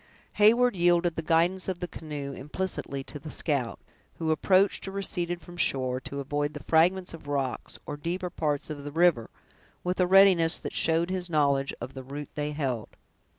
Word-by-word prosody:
Heyward 235 +3 +5
yielded 175 -1 +3
the - - -2
guidance 170 +4 +2
of 185 -2 -3
the 180 - -3
canoe 145 -4 -6
implicitly 145 -1 -4
to 150 - -9
the 150 - -9
scout, 140 -7 -1 0.4
who 160 -1 0
approached 190 +5 +2
or - - -4
receded 175 -3 -1
from 175 0 -12
the - - +2
shore, 130 -1 0
to 140 +1 -6
avoid 145 +2 -2
the 150 - -7
fragments 180 +3 +2
of 160 -3 -11
rocks, 140 -3 -3
or 145 - -5
deeper 175 +4 -3
parts 150 -1 -1
of 145 -2 -6
the 145 - -6
river, 165 -7 +3 0.5
with 180 +1 -2
a 180 - +4
readiness 185 -3 +6
that - - -5
showed 165 +2 +1
his 180 -1 -2
knowledge 140 -3 +2
of 125 +3 -7
the 135 - -7
route 140 +3 -8
they 150 0 -2
held. 130 -7 -2
160 Hz, 190 wpm, -28 LUFS, 145-180 Hz, 0.5 s, readiness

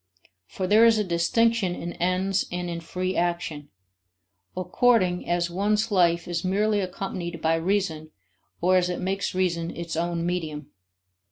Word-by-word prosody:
For 190 - -4
there 210 +4 +5
is 225 -1 +4
a 210 - +1
distinction 190 +3 +1
in 175 0 -5
ends 185 +2 0
and 175 0 -3
in 170 - -4
free 185 +3 -3
action, 170 -4 -2 0.9
according 185 -2 +2
as 175 0 0
one's 210 +4 0
life 170 -3 +3
is 170 -1 -2
merely 205 +3 +1
accompanied 180 -2 -4
by 160 +1 +1
reason 165 -2 -1 0.5
or 185 +2 +4
as 180 0 +1
it 180 - -3
makes 190 +1 -2
reason 170 -3 0
its 170 -1 -5
own 170 0 -1
medium. 160 -5 -3
180 Hz, 150 wpm, -25 LUFS, 170-195 Hz, 0.9 s, there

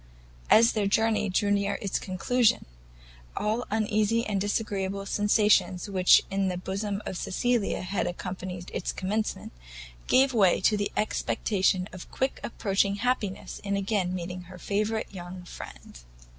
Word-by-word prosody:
As 230 +1 +7
their 210 -3 0
journey 215 0 +2
drew 205 +2 +1
near 200 0 +1
to - - -11
its 195 - -1
conclusion, 220 +5 +1 0.7
all 215 +2 0
the 245 - -4
uneasy 215 +1 +1
and 200 -2 -1
disagreeable 200 -2 -2
sensations 205 -3 +2
which 185 -2 +5
in 195 0 +1
the 180 -1 -2
bosom 200 +3 -3
of 185 - -4
Cecilia 240 +1 0
had 190 +2 -1
accompanied 180 0 -6
its - - -2
commencement, 210 +3 -3 0.6
gave 265 +1 +4
way 195 -6 +4
to 210 +3 +3
the 205 -1 -1
expectation 190 -3 0
of 185 - -9
quick 265 +1 -2
approaching 200 -3 0
happiness 215 -3 -2
in 200 0 -1
again 195 -2 0
meeting 180 0 -5
her 185 - -10
favourite 210 +4 -2
young 180 0 -8
friend. - - -10
200 Hz, 145 wpm, -27 LUFS, 185-215 Hz, 0.7 s, As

